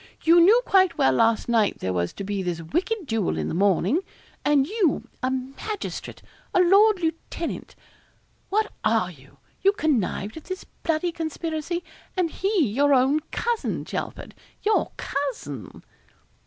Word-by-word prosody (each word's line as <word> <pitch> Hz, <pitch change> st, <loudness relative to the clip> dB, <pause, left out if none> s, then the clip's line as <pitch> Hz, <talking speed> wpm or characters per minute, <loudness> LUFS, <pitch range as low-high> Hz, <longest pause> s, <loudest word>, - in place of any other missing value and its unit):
'You 335 Hz, +1 st, +6 dB
knew 415 Hz, +8 st, +7 dB
quite 375 Hz, -2 st, +4 dB
well 135 Hz, -, +4 dB
last 225 Hz, -, +2 dB
night 225 Hz, -4 st, +2 dB
there 95 Hz, -, -2 dB
was 85 Hz, -1 st, -1 dB
to -, -, -6 dB
be 200 Hz, 0 st, -2 dB
this 175 Hz, -2 st, -2 dB
wicked 350 Hz, -, -2 dB
duel 225 Hz, -7 st, -1 dB
in -, -, -2 dB
the -, -, -3 dB
morning 195 Hz, -, +2 dB, 0.4 s
and 290 Hz, -2 st, +4 dB
you 385 Hz, -3 st, 0 dB
a 255 Hz, -, +1 dB
magistrate 265 Hz, +11 st, -5 dB, 0.3 s
a -, -, +5 dB
lord 400 Hz, +3 st, +5 dB
lieutenant 330 Hz, 0 st, -4 dB, 0.7 s
what 420 Hz, +2 st, +1 dB
are 215 Hz, -4 st, +2 dB
you? 140 Hz, -3 st, -18 dB, 0.2 s
you 395 Hz, +1 st, +4 dB
connived 255 Hz, -, -1 dB
at 320 Hz, -, -10 dB
this 370 Hz, 0 st, -5 dB
bloody 330 Hz, +1 st, -2 dB
conspiracy 325 Hz, +1 st, -3 dB, 0.3 s
and 350 Hz, -3 st, +1 dB
he 385 Hz, -3 st, +1 dB
your 280 Hz, +6 st, +3 dB
own 265 Hz, +4 st, +3 dB
cousin, 470 Hz, -1 st, -2 dB
Chelford -, -, -5 dB, 0.3 s
your 430 Hz, +1 st, +2 dB
cousin!' 225 Hz, -, -4 dB
295 Hz, 145 wpm, -25 LUFS, -, 0.7 s, knew